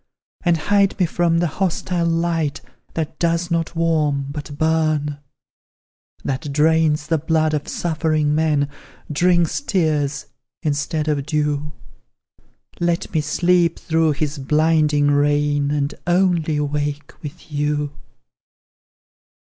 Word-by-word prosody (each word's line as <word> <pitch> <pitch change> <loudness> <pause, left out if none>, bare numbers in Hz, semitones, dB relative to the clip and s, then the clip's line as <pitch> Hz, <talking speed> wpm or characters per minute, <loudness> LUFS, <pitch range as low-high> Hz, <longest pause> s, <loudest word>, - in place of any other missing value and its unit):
And 175 -2 +3
hide 200 +5 +2
me 180 - +4
from 170 0 +1
the 170 - +2
hostile 175 0 -1
light 165 -3 0 0.4
That 160 -1 -3
does 170 +1 0
not 165 0 -1
warm, 150 -4 +1
but 145 0 -7
burn; 155 -2 +1 1.0
That 135 +2 -3
drains 155 0 +2
the 160 0 +1
blood 155 0 +1
of 150 -1 -2
suffering 155 -3 0
men; 150 -2 +2 0.4
Drinks 175 - +2
tears, 155 - 0 0.4
instead 150 +1 -1
of 145 -2 -1
dew; 150 -1 -1 1.1
Let 175 +2 -1
me 160 - +2
sleep 170 +2 +2
through 160 -1 +1
his 150 0 -3
blinding 150 0 +2
reign, 145 0 +2
And 145 0 -1
only 175 -4 +2
wake 145 0 -2
with 150 +2 -10
you! 150 0 -1
155 Hz, 115 wpm, -21 LUFS, 145-165 Hz, 1.1 s, me